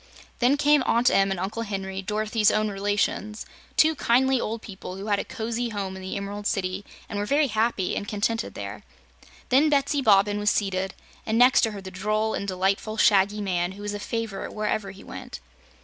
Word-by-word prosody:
Then 260 +4 +4
came 295 0 +4
Aunt 235 +2 +4
Em 195 0 +3
and 195 -2 -2
Uncle 205 +5 -3
Henry, 195 -3 -4
Dorothy's 215 +2 +1
own 215 0 +1
relations, 205 +1 -1 0.3
two 315 +1 +5
kindly 265 -2 +2
old 225 +1 -4
people 190 -3 -8
who 195 +1 -7
had 205 -2 +1
a - - -1
cozy 235 +2 -3
home 195 -3 -4
in 190 - -8
the 190 +2 -4
Emerald 205 +1 -4
City 185 0 -2 0.2
and 205 - -4
were 205 - -1
very 290 +4 +3
happy 215 -3 0
and 205 - -3
contented 225 +2 -1
there. - - -6 0.7
Then 280 +5 +5
Betsy 280 0 +2
Bobbin 205 -3 +4
was 210 0 +2
seated, 190 -2 -1 0.3
and 220 +1 0
next 250 +2 +6
to 225 - +2
her 200 - -7
the 190 0 -8
droll 215 +4 -1
and 200 - -3
delightful 195 +3 -1
Shaggy 205 0 +4
Man, 180 -2 -1
who 205 +1 -10
was 205 0 -3
a 205 - -4
favorite 225 -2 -4
wherever 215 -1 -1
he 195 0 -11
went. - - -8
210 Hz, 195 wpm, -25 LUFS, 195-230 Hz, 0.7 s, next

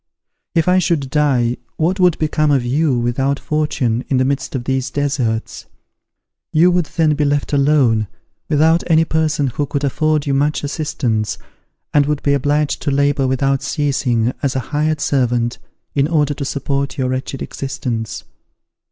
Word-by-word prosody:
If 165 0 +2
I 180 +1 +4
should 155 -7 0
die 130 -5 +2 0.2
what 180 +5 0
would 180 -3 +4
become 155 -1 +1
of 135 -4 +2
you, 140 +1 +1
without 130 +4 0
fortune, 130 -6 -1
in 135 - +2
the 130 - +2
midst 140 +1 -2
of 125 - -2
these 130 0 -1
deserts? 130 -6 -2 0.8
You 170 +4 +4
would 175 -3 +1
then 160 -1 +1
be 150 0 0
left 145 0 0
alone, 135 -7 +3 0.4
without 160 +3 +3
any 165 -1 +4
person 155 -2 0
who 140 +3 -2
could 140 0 -3
afford 155 +2 +1
you 140 - 0
much 145 +3 +1
assistance, 135 -8 -2 0.6
and 145 -1 +4
would 150 -1 -1
be 140 - +2
obliged 145 +2 0
to - - -1
labour 140 -1 +2
without 135 +1 +1
ceasing, 135 -5 0
as 140 -3 -1
a - - +1
hired 155 0 0
servant, 120 -3 0 0.3
in 140 0 +2
order 150 -3 +1
to 140 -1 -5
support 140 +1 -2
your 130 -2 0
wretched 130 +1 -3
existence. 120 -5 -4
140 Hz, 160 wpm, -18 LUFS, 130-150 Hz, 0.8 s, I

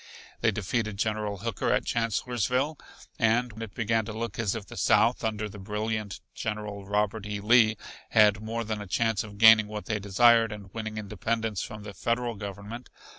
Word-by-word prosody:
They - - +3
defeated 105 0 -2
General 105 -1 -1
Hooker 115 +1 -2
at - - +1
Chancellorsville, 125 +5 0 0.4
and 115 0 +1
it 110 -3 -7
began 115 -1 +1
to 110 - -6
look 115 -1 -5
as 110 -1 0
if 110 -3 -5
the - - -11
South, 110 +4 +3
under 110 -1 -1
the 105 0 -10
brilliant 105 0 -3
General, 105 -2 -5
Robert 105 +1 0
E. 105 -1 -3
Lee, 110 0 +4 0.3
had 105 -2 +5
more 115 +1 -3
than 110 -1 -4
a 105 - -7
chance 115 +2 +1
of 105 -2 -11
gaining 110 0 +8
what 105 -2 -6
they 105 0 -1
desired, 115 +3 +4
and 100 -3 -9
winning 110 -1 -5
independence 110 0 -2
from 105 -1 -7
the 100 -1 -8
Federal 120 +3 -1
Government. 100 +3 -8
110 Hz, 180 wpm, -28 LUFS, 105-115 Hz, 0.4 s, gaining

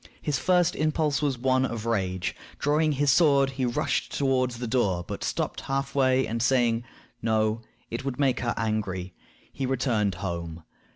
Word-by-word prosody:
His 145 -4 -1
first 180 -2 +3
impulse 155 -1 +1
was 140 -4 0
one 130 +1 +2
of 115 -4 -3
rage. 95 -5 -1 0.2
Drawing 150 +1 +2
his 140 0 +3
sword, 140 -3 +4
he 130 -1 -2
rushed 140 +2 -1
toward 130 -2 +2
the 120 0 -6
door, 100 -8 0
but - - -5
stopped - - -2
half 135 0 -2
way, 130 -1 +3
and 115 +1 -3
saying, 120 -2 +2 0.4
"No, 110 0 +1 0.3
it 115 +3 -3
would 135 -1 -4
make 135 -3 +2
her 120 -1 -1
angry," 95 -5 -2 0.4
he 135 - -2
returned 115 -7 0
home. 85 -3 -5
125 Hz, 165 wpm, -27 LUFS, 110-135 Hz, 0.4 s, sword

